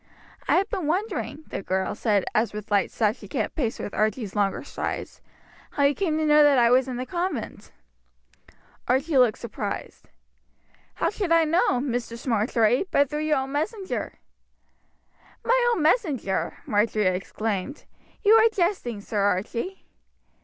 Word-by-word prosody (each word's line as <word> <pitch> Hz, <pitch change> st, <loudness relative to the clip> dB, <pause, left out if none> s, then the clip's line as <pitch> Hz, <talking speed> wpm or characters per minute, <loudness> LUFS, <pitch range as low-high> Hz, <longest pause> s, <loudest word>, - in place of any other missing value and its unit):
"I -, -, +4 dB
have 390 Hz, -, +2 dB
been 370 Hz, -7 st, -2 dB
wondering," 360 Hz, -3 st, -2 dB
the -, -, -4 dB
girl 190 Hz, 0 st, -1 dB
said, 210 Hz, -3 st, +1 dB
as 225 Hz, -1 st, +1 dB
with 210 Hz, 0 st, -7 dB
light 200 Hz, -2 st, +2 dB
steps 220 Hz, 0 st, 0 dB
she -, -, -11 dB
kept -, -, -2 dB
pace 240 Hz, -8 st, -1 dB
with 205 Hz, -, -6 dB
Archie's 215 Hz, -1 st, -1 dB
longer 200 Hz, -2 st, 0 dB
strides, -, -, -5 dB, 0.5 s
"how 285 Hz, -, +1 dB
you 280 Hz, +1 st, +4 dB
came 320 Hz, -2 st, -1 dB
to 315 Hz, -, 0 dB
know 300 Hz, 0 st, +6 dB
that 290 Hz, -2 st, +5 dB
I 235 Hz, -1 st, +5 dB
was 260 Hz, +1 st, +4 dB
in 255 Hz, -2 st, -4 dB
the 255 Hz, -, -3 dB
convent." 360 Hz, +5 st, -4 dB, 1.2 s
Archie 270 Hz, +3 st, +2 dB
looked 245 Hz, -4 st, +4 dB
surprised. 210 Hz, -3 st, -6 dB, 0.9 s
"How -, -, 0 dB
should 400 Hz, -5 st, -3 dB
I 330 Hz, 0 st, +5 dB
know, 315 Hz, -5 st, +2 dB
Mistress 240 Hz, -3 st, -4 dB
Marjory, 230 Hz, -, +2 dB
but 280 Hz, -1 st, +2 dB
through 300 Hz, +1 st, -2 dB
your 305 Hz, -1 st, +2 dB
own 265 Hz, 0 st, -3 dB
messenger?" 375 Hz, +7 st, -3 dB, 1.3 s
"My 485 Hz, 0 st, +3 dB
own 325 Hz, -, -1 dB
messenger!" 300 Hz, -, 0 dB
Marjory 210 Hz, 0 st, +1 dB
exclaimed. 195 Hz, +6 st, -2 dB, 0.4 s
"You 420 Hz, +1 st, +6 dB
are 450 Hz, 0 st, +7 dB
jesting, 345 Hz, -, -1 dB
Sir 205 Hz, +1 st, -3 dB
Archie." 205 Hz, -, -1 dB
260 Hz, 155 wpm, -25 LUFS, 215-325 Hz, 1.3 s, are